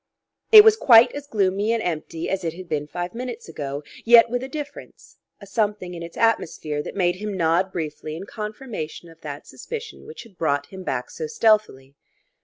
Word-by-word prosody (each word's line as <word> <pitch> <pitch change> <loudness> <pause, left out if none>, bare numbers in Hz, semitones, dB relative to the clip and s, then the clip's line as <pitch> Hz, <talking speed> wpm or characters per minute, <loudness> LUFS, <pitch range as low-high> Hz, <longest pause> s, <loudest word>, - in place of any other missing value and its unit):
It 430 -2 +12
was 440 0 +6
quite 235 - +7
as 285 0 -8
gloomy 200 -1 0
and 230 -1 0
empty 165 -1 -4
as 190 -1 -2
it 165 -1 -3
had 185 0 -10
been 150 -2 -2
five 175 +3 -5
minutes 245 0 -6
ago, 145 -2 -5 0.2
yet 235 0 +7
with 245 0 -1
a 260 - -5
difference, 290 0 -9 0.2
a 200 - -11
something 205 -3 -2
in 170 - -7
its 170 0 -9
atmosphere 160 -9 0
that - - -8
made 175 -2 +1
him 205 -1 -5
nod 170 +3 +1
briefly 155 -2 -5
in 180 +4 -7
confirmation 210 -7 -7
of 165 0 -18
that 145 -1 -7
suspicion 460 -1 -8
which 460 0 -9
had 205 -7 -20
brought 145 -3 0
him 190 +3 -10
back 130 -8 -4
so 470 - -5
stealthily. 215 - +1
190 Hz, 195 wpm, -23 LUFS, 160-230 Hz, 0.2 s, It